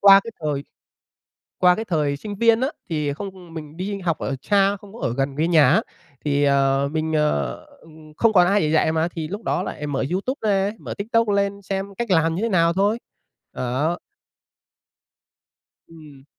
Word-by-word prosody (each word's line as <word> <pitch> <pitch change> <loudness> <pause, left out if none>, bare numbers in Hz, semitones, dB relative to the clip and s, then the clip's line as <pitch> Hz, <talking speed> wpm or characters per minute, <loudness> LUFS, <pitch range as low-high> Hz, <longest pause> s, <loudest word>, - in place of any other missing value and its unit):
qua 195 -1 +8
cái 230 - -6
thời 145 -3 -2 1.0
qua 180 -1 +5
cái 220 +3 -4
thời 150 -6 0
sinh 205 +6 -6
viên 230 +2 +4
á 265 - +2 0.2
thì 150 -3 -1
không 185 0 -9
mình 155 -1 -8
đi 200 +2 -3
học 170 -4 -1
ở 135 - -2
xa 200 +2 +2
không 200 0 -15
có 235 - -10
ở 115 - -1
gần 135 0 -1
với 160 +3 +1
nhà 155 -6 +5
á 180 +10 +4 0.4
thì, 145 -1 +2
ờ, 140 0 +2
mình, 160 0 -1
ờ, 75 - +1 0.3
ừm, 155 -1 -16
không 230 -1 +3
còn 180 -3 +6
ai 205 +2 +3
để 155 0 0
dạy 160 - +3
mà 160 +1 +1
thì 165 -3 -5
lúc 205 +6 -6
đó - - 0
lại 150 0 -5
mở 135 -2 -1
YouTube 225 +9 -1
ra, 195 +1 +2
mở - - -6
TikTok 230 +2 +1
lên 200 0 0
xem 195 +1 -4
cách 235 -1 -3
làm 165 -1 +3
như 185 - -2
thế 230 - 0
nào 170 -3 +3
thôi. 205 +5 +1 0.5
Đó. 145 +8 -1 1.9
Ừm. 150 -5 -15
170 Hz, 195 wpm, -22 LUFS, 150-200 Hz, 1.9 s, qua